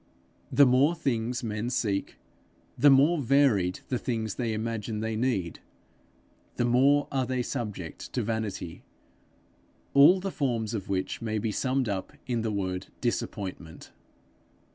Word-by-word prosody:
The 140 Hz, -, +6 dB
more 135 Hz, +6 st, +4 dB
things 125 Hz, -5 st, -2 dB
men 110 Hz, +1 st, -2 dB
seek, 105 Hz, -5 st, -1 dB, 0.6 s
the 145 Hz, -, +5 dB
more 145 Hz, +4 st, +5 dB
varied 115 Hz, -9 st, +2 dB
the 125 Hz, -, -1 dB
things 110 Hz, -4 st, -2 dB
they 120 Hz, -3 st, -2 dB
imagine 110 Hz, 0 st, -3 dB
they 110 Hz, 0 st, -2 dB
need, 110 Hz, -8 st, -1 dB, 1.0 s
the 120 Hz, -, 0 dB
more 135 Hz, +4 st, +4 dB
are 130 Hz, -2 st, 0 dB
they 130 Hz, -1 st, -1 dB
subject 105 Hz, -, -5 dB
to 125 Hz, -, 0 dB
vanity 105 Hz, -6 st, -4 dB, 1.1 s
all 145 Hz, +7 st, +7 dB
the 195 Hz, +1 st, -4 dB
forms 120 Hz, -, -1 dB
of 100 Hz, -4 st, -4 dB
which 95 Hz, -1 st, -2 dB
may 110 Hz, -1 st, -2 dB
be 110 Hz, +1 st, -1 dB
summed 130 Hz, +4 st, 0 dB, 0.4 s
in 120 Hz, -3 st, -1 dB
the 110 Hz, -, -1 dB
word 95 Hz, -2 st, -3 dB
disappointment. 95 Hz, -8 st, -4 dB
115 Hz, 135 wpm, -28 LUFS, 105-130 Hz, 1.1 s, all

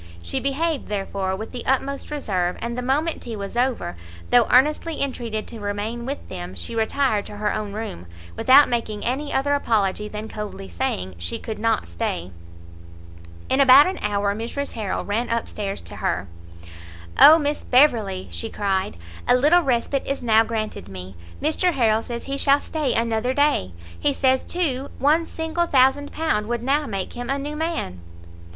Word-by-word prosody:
She 85 Hz, -, -1 dB
behaved, 295 Hz, +2 st, -1 dB
therefore, 195 Hz, -2 st, -2 dB
with 220 Hz, +3 st, -7 dB
the 245 Hz, -2 st, -5 dB
utmost 270 Hz, +1 st, 0 dB
reserve, 190 Hz, -12 st, -1 dB
and 235 Hz, 0 st, -4 dB
the 250 Hz, -, -3 dB
moment 290 Hz, +6 st, 0 dB
tea 235 Hz, -2 st, -6 dB
was 200 Hz, +2 st, -6 dB
over, 240 Hz, -, 0 dB, 0.4 s
though 240 Hz, -2 st, +5 dB
earnestly 300 Hz, +5 st, +3 dB
entreated 235 Hz, -6 st, -3 dB
to 230 Hz, -, -8 dB
remain 210 Hz, +4 st, -4 dB
with 280 Hz, +2 st, -5 dB
them, 90 Hz, +1 st, -7 dB
she 85 Hz, -, -4 dB
retired 225 Hz, -1 st, +1 dB
to 210 Hz, -, -9 dB
her 210 Hz, 0 st, 0 dB
own 210 Hz, -2 st, -4 dB
room, 205 Hz, -, -6 dB, 0.3 s
without 275 Hz, -, +6 dB
making 220 Hz, -3 st, -2 dB
any 280 Hz, +4 st, -2 dB
other 285 Hz, +2 st, +1 dB
apology 210 Hz, -7 st, +1 dB
than 210 Hz, +1 st, -6 dB
coldly 210 Hz, -, -7 dB
saying 90 Hz, +2 st, -2 dB
she 85 Hz, 0 st, -3 dB
could 220 Hz, -, -6 dB
not 225 Hz, -, +1 dB
stay. 85 Hz, +1 st, -3 dB, 1.2 s
In 265 Hz, -, +2 dB
about 275 Hz, +2 st, +9 dB
an 375 Hz, -, -3 dB
hour 205 Hz, -1 st, 0 dB
Mrs 235 Hz, +6 st, -4 dB
Harrel 210 Hz, -4 st, -3 dB
ran 220 Hz, +4 st, -1 dB
up 230 Hz, 0 st, -1 dB
stairs 200 Hz, -2 st, -4 dB
to 85 Hz, -, -9 dB
her. 90 Hz, +2 st, -1 dB, 0.9 s
"Oh 315 Hz, -, +10 dB
Miss 295 Hz, -1 st, -2 dB
Beverley," 225 Hz, -8 st, +3 dB
she 225 Hz, -, -4 dB
cried, 195 Hz, -, -1 dB, 0.3 s
"a 245 Hz, -, +6 dB
little 300 Hz, +8 st, +5 dB
respite 265 Hz, -1 st, 0 dB
is 275 Hz, -2 st, -2 dB
now 225 Hz, -1 st, +5 dB
granted 220 Hz, -, -4 dB
me! 95 Hz, 0 st, -8 dB, 0.2 s
Mr 335 Hz, +4 st, +1 dB
Harrel 225 Hz, -5 st, +2 dB
says 235 Hz, 0 st, -6 dB
he 275 Hz, 0 st, -4 dB
shall 280 Hz, +1 st, +5 dB
stay 300 Hz, -2 st, -2 dB
another 230 Hz, +2 st, 0 dB
day; 285 Hz, -, +2 dB, 0.3 s
he 285 Hz, -, +2 dB
says, 260 Hz, -1 st, +2 dB
too, 285 Hz, -7 st, -1 dB
one 315 Hz, +4 st, +2 dB
single 325 Hz, +1 st, -2 dB
thousand 270 Hz, +1 st, +3 dB
pound 260 Hz, -10 st, -1 dB
would 240 Hz, 0 st, -2 dB
now 285 Hz, +3 st, +1 dB
make 195 Hz, -3 st, -4 dB
him 245 Hz, +1 st, -6 dB
a 275 Hz, -, +1 dB
new 290 Hz, +2 st, -5 dB
man." 315 Hz, -, -3 dB
235 Hz, 175 wpm, -23 LUFS, 205-280 Hz, 1.2 s, Oh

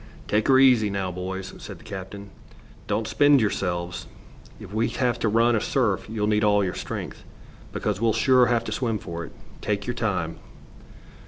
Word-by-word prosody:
"Take 105 Hz, +1 st, +1 dB
her 130 Hz, -, +6 dB
easy, 125 Hz, -5 st, +5 dB
now, 100 Hz, -2 st, -2 dB
boys," 95 Hz, +1 st, -5 dB
said -, -, -9 dB
the -, -, -17 dB
captain. 100 Hz, -1 st, -8 dB, 0.6 s
"Don't 110 Hz, 0 st, -1 dB
spend 145 Hz, +4 st, +5 dB
yourselves. 90 Hz, -5 st, -2 dB, 0.5 s
If 100 Hz, -, -10 dB
we 110 Hz, +2 st, +1 dB
have 125 Hz, -4 st, -1 dB
to 110 Hz, -, +1 dB
run 115 Hz, +2 st, +3 dB
a 110 Hz, -, +1 dB
surf 115 Hz, -6 st, 0 dB
you'll 110 Hz, -2 st, -1 dB
need 105 Hz, 0 st, +2 dB
all 105 Hz, -1 st, +4 dB
your 90 Hz, -, -2 dB
strength, -, -, -6 dB, 0.5 s
because 105 Hz, -1 st, -2 dB
we'll 115 Hz, -1 st, +3 dB
sure 125 Hz, +3 st, +4 dB
have 120 Hz, -1 st, +1 dB
to -, -, -5 dB
swim 115 Hz, -4 st, -1 dB
for 85 Hz, -3 st, -6 dB
it. -, -, -12 dB, 0.3 s
Take 100 Hz, -1 st, -2 dB
your 125 Hz, -, -2 dB
time." 100 Hz, -9 st, -2 dB
105 Hz, 180 wpm, -25 LUFS, 95-120 Hz, 0.6 s, her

